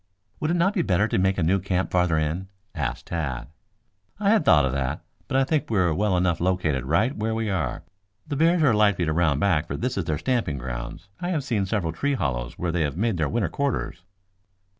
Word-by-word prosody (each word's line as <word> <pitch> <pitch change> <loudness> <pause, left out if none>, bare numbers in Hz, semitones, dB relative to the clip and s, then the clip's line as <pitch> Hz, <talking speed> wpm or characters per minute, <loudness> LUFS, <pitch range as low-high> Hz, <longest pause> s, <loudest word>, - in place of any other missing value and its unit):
"Would 155 - -1
it 170 - +2
not 180 +4 +2
be 185 - +1
better 100 - +2
to 100 - 0
make 95 +1 +2
a 90 - +1
new 95 +5 +3
camp 95 0 -1
farther 90 -3 +2
in?" 80 +5 -1 0.3
asked 70 -8 -3
Tad. 75 -8 -4 0.7
"I 205 -1 +3
had 220 -2 +4
thought 75 -3 +5
of 65 - 0
that, 70 +1 -2 0.3
but 130 - 0
I 135 - +4
think 150 +2 0
we 110 - 0
are 90 -4 +3
well 100 +1 +1
enough 90 -2 +1
located 85 -8 0
right 85 - +2
where 110 +1 -1
we 110 -2 -1
are. 80 -9 -2 0.4
The 145 - -3
bears 165 +3 +3
are 130 -6 +5
likely 105 -4 +3
to 80 - 0
round 80 -4 +2
back, 85 -5 +2
for - - -4
this 125 -4 -2
is 90 - -2
their 75 -2 -1
stamping 120 - -1
ground. - - -6 0.2
I 175 - -3
have 160 -6 -1
seen 110 -7 -1
several 95 -6 -1
tree 140 +9 0
hollows 65 - -3
where 85 -1 -1
they 85 0 0
have 75 0 -1
made 110 -1 0
their 75 -3 0
winter 110 -7 0
quarters." 135 -10 -2
90 Hz, 230 wpm, -25 LUFS, 80-120 Hz, 0.7 s, thought